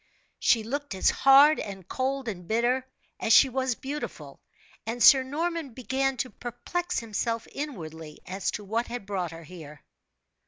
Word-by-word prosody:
She 225 -2 +3
looked 285 0 -4
as 190 - +3
hard 280 +3 +6
and 195 -3 -7
cold 265 +2 -2
and 180 -5 -6
bitter, 245 +3 +1 0.3
as 225 - +2
she 270 - +7
was 260 -1 -1
beautiful; 285 +5 -7 0.4
and 230 +1 -2
Sir 265 +3 +9
Norman 305 0 -3
began 265 +1 -1
to 255 - -3
perplex 350 +9 -4
himself 230 +1 -3
inwardly 160 - -7
as 190 +1 -3
to 210 - -4
what 225 +4 -2
had 240 -4 -6
brought 190 -4 -2
her 165 +1 -10
here. 150 -3 -12
240 Hz, 155 wpm, -27 LUFS, 195-270 Hz, 0.4 s, Sir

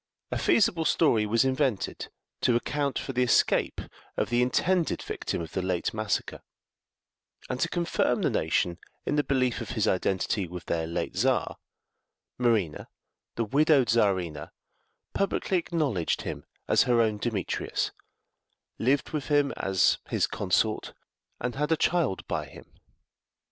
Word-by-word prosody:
A - - -1
feasible 180 -6 +3
story 115 -10 +3
was 115 +4 +3
invented 130 -5 -1 0.3
to 120 - +3
account 140 +3 -1
for 135 - -4
the 125 - +1
escape 125 -2 +2 0.4
of - - -1
the 120 0 +3
intended 170 +8 +1
victim - - -4
of 80 - -9
the 95 - -2
late 90 -2 -1
massacre; 110 -2 -2 1.1
and 125 - -3
to 165 - +1
confirm 170 -1 0
the - - +2
nation 85 -1 0 0.3
in - - 0
the 145 - +2
belief 130 -3 0
of - - -6
his 110 - +2
identity 95 +1 0
with 90 0 -8
their 80 -1 -1
late 85 - -3
Czar, - - +1 0.8
Marina, 110 -10 +1 0.5
the 115 - 0
widowed 140 +1 +3
Czarina, 95 -8 +1 0.6
publicly 195 -1 0
acknowledged 145 - -1
him - - -6 0.2
as - - +4
her 120 -1 +3
own 110 -2 +2
Demetrius, 105 -4 -2 0.9
lived 135 +4 +1
with 150 -3 -3
him 145 -2 +2
as 95 -1 +2
his - - +2
consort, 100 +3 0 0.4
and 125 0 -2
had 150 +3 -1
a 160 - +4
child 160 - +1
by - - -2
him. - - -13
120 Hz, 145 wpm, -27 LUFS, 100-145 Hz, 1.1 s, as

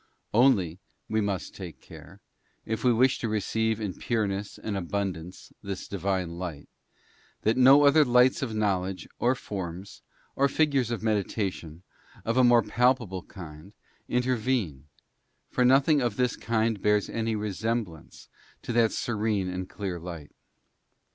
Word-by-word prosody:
Only, 105 -8 +3 0.3
we 110 0 0
must 100 -2 -3
take 85 -8 -9
care, - - -14 0.4
if 110 0 -3
we 125 - +5
wish 125 +3 +3
_ - - -14
to 115 - -1
receive 110 +1 0
in 105 -4 -3
pureness 105 -3 -2
and 105 - -4
abundance 95 -2 -4
this 100 -2 -6
Divine 95 -3 -2
light, 85 -6 -6 0.8
that 110 - +3
_ - - +1
no 135 +3 +8
other 150 +2 +6
lights 125 0 +4
of 120 -5 -3
knowledge, 95 -3 -1
or 125 +2 +2
forms, 95 -6 -7 0.3
or 140 - +3
figures 140 -5 +1
of 120 - -3
medita 105 -3 +1
_ 100 -4 -1
tions, 80 +2 -11 0.4
of 115 - 0
a 130 - +5
more 120 -1 +6
palpable 120 -7 +1
kind, 85 0 -11 0.4
intervene, 120 - -1 0.6
for 125 - +2
nothing 135 +3 +4
of 120 -4 -1
this 125 0 +1
__ - - -21
kind 110 -2 0
bears 105 -1 +2
any 115 -1 -2
resemblance 105 -4 -4 0.4
to 120 - -4
that 115 -1 +3
serene 105 -4 -1
and 90 0 -5
clear 95 -4 -4
light. 85 -3 -8
105 Hz, 155 wpm, -27 LUFS, 95-120 Hz, 0.8 s, no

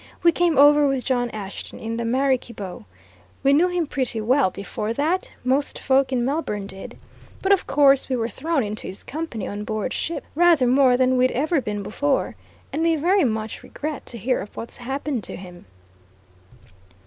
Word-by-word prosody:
"We 340 - +7
came 340 -3 +1
over 290 +1 +7
with 270 -2 -1
John 245 -2 +1
Ashton 200 -3 -7
in 225 +1 -4
the 235 - -2
Maraquibo. 240 -5 -1 0.6
We 275 0 +5
knew 325 +5 +5
him 355 -2 -1
pretty 255 -5 -2
well 250 +1 +3
before 210 +3 -4
that 320 +9 0
most 270 +3 0
folk 265 0 +2
in 245 -2 +1
Melbourne 255 -8 -2
did. 195 0 -10 0.5
But 385 - +2
of 395 - +3
course, 275 -1 +4
we 260 - +1
were 230 -2 -1
thrown 290 +5 -1
into 210 0 -5
his 190 - -8
company 290 -9 -5
on 205 +1 -5
board 215 +2 -3
ship 335 - -3
rather 335 -4 +4
more 255 0 +4
than 255 0 +3
we'd 255 +1 +4
ever 300 +3 +1
been 205 -3 -4
before. 275 +7 -1 0.4
And 310 - -1
we 330 0 +3
very 355 +5 +3
much 220 -2 -3
regret 300 -1 -6
to 235 - -7
hear 250 +4 0
of 205 - -10
what's 230 - -5
happened 265 -1 -3
to - - -7
him." 180 - -11
260 Hz, 185 wpm, -23 LUFS, 225-295 Hz, 0.6 s, We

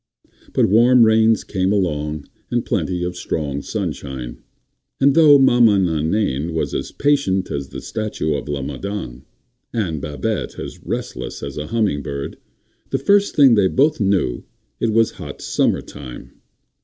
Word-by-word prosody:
But - - +3
warm 120 +4 +5
rains 110 0 +4
came 95 -1 -1
along 75 -6 -1 0.2
and - - -1
plenty 90 -1 -1
of 90 0 -3
strong 75 -5 -3
sunshine, 65 -4 -5 0.6
and 140 0 +4
though 150 -2 +7
Maman 120 -7 +5
Nainaine 80 -1 -1
was 80 - -2
as - - -3
patient 140 -11 +1
as 70 -1 -4
the - - -8
statue 105 -8 -3
of 70 +1 -4
la 70 -2 -2
Madone, 70 -2 -5 0.5
and 85 - -2
Babette 75 0 -3
as - - -8
restless - - -5
as 70 -1 -5
a 75 0 -5
humming 105 -10 0
bird, 70 0 -6 0.5
the 135 - 0
first 200 +9 +2
thing 135 -4 +7
they 100 -4 +4
both 145 +8 +2
knew 95 - 0 0.4
it 115 - 0
was 115 0 +3
hot - - -9
summer - - 0
time. 65 -4 -10
95 Hz, 150 wpm, -20 LUFS, 75-115 Hz, 0.6 s, though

